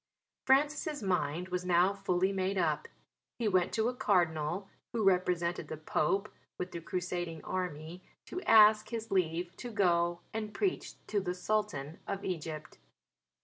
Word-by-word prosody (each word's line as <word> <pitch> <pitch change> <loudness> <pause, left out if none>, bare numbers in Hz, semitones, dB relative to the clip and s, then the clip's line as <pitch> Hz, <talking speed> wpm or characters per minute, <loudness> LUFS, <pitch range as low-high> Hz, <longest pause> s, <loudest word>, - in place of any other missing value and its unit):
Francis' 290 - +2
mind 180 -2 0
was 180 0 -2
now 180 +2 +4
fully 190 -1 +1
made 195 0 -1
up. - - +1 0.5
He 230 - 0
went 185 -2 +2
to 220 0 +1
a 250 - 0
Cardinal, 175 -4 +1 0.3
who 225 -2 0
represented 180 -2 +1
the 155 - -5
Pope, 195 +6 0 0.3
with 180 0 -4
the 170 - -6
Crusading 175 -2 -3
Army 180 -1 -4 0.2
to 365 - -5
ask 215 -1 +7
his 225 -2 -5
leave 175 -1 0
to 245 - -6
go 175 -5 +2
and 215 -1 -4
preach 390 -3 -1
to 210 - 0
the 180 -2 -3
Sultan 180 -7 -2
of 195 0 -3
Egypt. 155 - -5
185 Hz, 145 wpm, -32 LUFS, 170-210 Hz, 0.5 s, ask